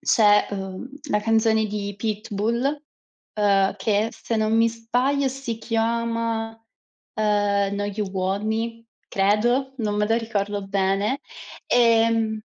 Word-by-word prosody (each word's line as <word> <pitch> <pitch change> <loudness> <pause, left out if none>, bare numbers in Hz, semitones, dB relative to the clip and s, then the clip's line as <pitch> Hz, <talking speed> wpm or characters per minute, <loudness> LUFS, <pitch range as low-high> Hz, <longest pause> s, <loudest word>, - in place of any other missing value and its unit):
c'è, 210 -2 +4
ehm, 195 +3 -5 0.2
la 210 - +2
canzone 220 0 +2
di 205 -1 -4
Pitbull, 225 +6 -2 0.5
ehm, 200 -2 +3
che, 210 +2 +1
se 230 - -4
non 220 0 +1
mi 230 0 +4
sbaglio, 250 +5 0
si 260 -4 -5
chiama, 230 0 -1 0.6
ehm, 205 -2 +1
No 205 0 -2
you 205 0 -3
want 190 +2 -1
me, 230 +1 -3 0.2
credo, 240 +7 +1
non 210 -2 -1
me 210 0 +1
la 225 - +3
ricordo 205 -3 -2
bene, 195 +6 0 0.5
ehm 225 -2 +3
220 Hz, 125 wpm, -23 LUFS, 205-230 Hz, 0.6 s, c'è